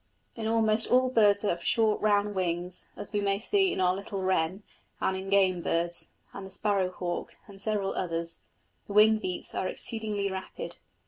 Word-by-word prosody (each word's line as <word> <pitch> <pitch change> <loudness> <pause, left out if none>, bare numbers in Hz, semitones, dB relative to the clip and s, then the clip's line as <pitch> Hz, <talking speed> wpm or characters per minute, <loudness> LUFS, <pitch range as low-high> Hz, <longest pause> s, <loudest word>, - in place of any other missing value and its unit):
In 225 -2 -3
almost 225 0 +2
all 255 0 +4
birds 205 -4 +4
that 210 - 0
have 170 0 -2
short, 220 -2 +2
round 205 -1 +2
wings, 180 -1 -3
as 205 - -5
we 205 - +1
may 200 -1 +1
see 385 - +2
in - - -3
our 180 -1 +3
little 195 0 -5
wren, 185 +1 0 0.4
and 190 - 0
in 190 +1 -5
game 190 -3 +3
birds, 170 +1 -1 0.2
and 195 - -7
the 190 - -8
sparrow 195 -1 0
hawk, 175 -1 -4
and 195 -2 -11
several 205 -2 -1
others, 165 -2 -3 0.5
the 200 - -6
wing 215 +1 +6
beats 185 -4 -5
are 185 - -1
exceedingly 210 -2 -2
rapid. 190 -2 -6
200 Hz, 185 wpm, -29 LUFS, 185-215 Hz, 0.5 s, wing